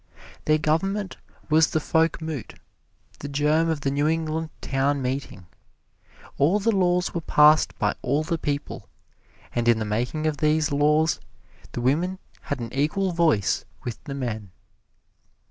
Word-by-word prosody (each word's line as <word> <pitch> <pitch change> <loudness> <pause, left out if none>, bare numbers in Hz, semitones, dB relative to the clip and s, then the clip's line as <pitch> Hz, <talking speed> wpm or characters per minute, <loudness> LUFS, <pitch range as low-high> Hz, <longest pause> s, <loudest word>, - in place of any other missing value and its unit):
Their 155 0 +4
Government 190 +6 -1 0.3
was 155 0 +4
the 155 - 0
Folkmoot, 160 -3 -1 0.6
the 145 - -6
germ 150 +3 +2
of 160 -3 -1
the 135 - 0
New 145 +2 +1
England 160 0 -1
Town 135 +1 0
Meeting. 130 -7 -4 0.9
All 170 +9 +4
the 225 +3 +2
laws 180 -1 +1
were 170 - -2
passed 150 0 +4
by - - +1
all 140 +4 0
the 165 +1 -2
people, 145 -1 -4 0.6
and 120 -1 -1
in 120 -1 +5
the 110 - -2
making 120 +9 -2
of 155 -2 0
these 155 0 +2
laws, 150 +2 +2 0.5
the 120 - -3
women 165 +9 +1 0.2
had 145 - -4
an 115 -1 -6
equal 155 +8 0
voice 160 - +2 0.2
with 120 -2 -6
the 140 - -5
men. 110 -7 -4
150 Hz, 145 wpm, -25 LUFS, 135-160 Hz, 0.9 s, in